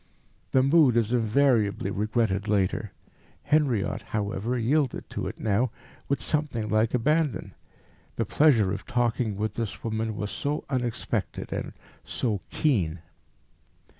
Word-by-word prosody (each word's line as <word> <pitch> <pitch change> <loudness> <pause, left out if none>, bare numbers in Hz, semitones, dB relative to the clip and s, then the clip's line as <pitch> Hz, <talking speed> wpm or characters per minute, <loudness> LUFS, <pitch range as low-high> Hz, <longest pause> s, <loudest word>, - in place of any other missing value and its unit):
The 130 - +4
mood 140 -4 +5
is 115 0 +1
invariably 115 -4 +2
regretted 105 -1 0
later. 100 -3 0 0.5
Henriot, 135 -10 +1
however, 105 +3 -2
yielded 130 +3 0
to - - -3
it - - -7
now 110 +4 +1 0.4
with 135 -4 0
something 140 -8 -1
like 110 +2 +2
abandon. 150 +3 0 0.6
The - - 0
pleasure 120 -11 +4
of 100 - -6
talking 120 -4 0
with 110 +1 -2
this 115 -4 -4
woman 110 -1 -2
was 105 -2 -3
so 145 +9 -2
unexpected, 120 -3 -2
and - - -4 0.3
so 105 -6 -2
keen. 90 - 0
115 Hz, 125 wpm, -27 LUFS, 105-130 Hz, 0.6 s, mood